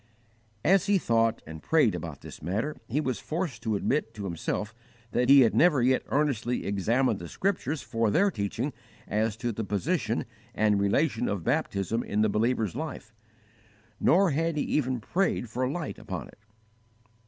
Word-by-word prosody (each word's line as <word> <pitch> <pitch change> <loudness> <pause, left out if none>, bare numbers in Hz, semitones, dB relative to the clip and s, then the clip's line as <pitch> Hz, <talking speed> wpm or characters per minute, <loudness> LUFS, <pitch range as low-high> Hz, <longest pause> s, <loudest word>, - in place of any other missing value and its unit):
As 195 +3 +4
he 205 -1 +4
thought 115 -7 +1
and 80 0 -9
prayed 150 - +3
about 85 -4 -6
this - - -11
matter, 110 - -2
he 135 +6 0
was 130 -5 -1
forced 165 -3 -3
to 110 -2 -1
admit 115 +2 -1
to 105 - -6
himself 100 +4 -3 0.4
that 125 +3 +1
he 140 0 +9
had 115 - +4
never 160 -5 +4
yet 130 +1 +3
earnestly 130 -5 0
examined 110 +4 +1
the 85 - -7
Scriptures 160 - -2
for 115 -1 0
their 195 - +3
teaching 105 - -3 0.3
as 110 0 0
to 120 0 -2
the 110 +1 -4
position 110 - -1 0.3
and 105 -1 +3
relation 120 +4 +1
of 100 -4 -2
baptism 100 +7 0
in 105 -2 -1
the 110 - +3
believer's 110 -1 0
life, 140 -6 -6 0.9
nor 185 +1 +4
had 165 +2 0
he 145 - +1
even 130 -4 0
prayed 175 - 0
for 125 +2 -1
light 160 +3 -4
upon - - -6
it. - - -18
120 Hz, 165 wpm, -28 LUFS, 105-150 Hz, 0.9 s, he